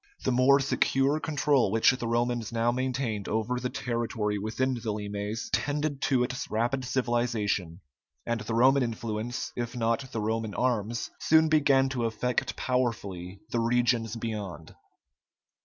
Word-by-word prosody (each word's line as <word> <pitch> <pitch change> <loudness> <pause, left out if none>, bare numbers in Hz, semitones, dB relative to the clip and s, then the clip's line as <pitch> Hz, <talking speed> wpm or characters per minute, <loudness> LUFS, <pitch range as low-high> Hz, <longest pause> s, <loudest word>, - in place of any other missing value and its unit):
The - - +1
more 130 +3 +5
secure 135 +1 +2
control 145 -6 +2
which 110 +3 +5
the 130 -3 -3
Romans 120 -1 0
now 115 +1 +1
maintained 125 -4 -2
over 110 +3 -1
the 125 - -2
territory 115 -5 -2
within 120 +6 -1
the 115 -3 -3
limes, 105 +1 -4
tended 145 -1 -1
to 130 -4 +2
its 130 +1 -4
rapid 120 +5 0
civilization, 120 -8 -1 0.4
and 115 -1 -1
the 115 - -3
Roman 135 +4 +5
influence, 115 0 -3
if 120 0 -4
not 120 +3 -1
the 115 - -3
Roman 110 0 -2
arms, 115 -2 -1
soon 160 0 +4
began 140 -3 +4
to 125 -3 -1
affect 115 +2 -1
powerfully 100 -7 -2
the 120 - +1
regions 120 -1 +1
beyond. 105 -8 -5
120 Hz, 140 wpm, -28 LUFS, 110-130 Hz, 0.4 s, more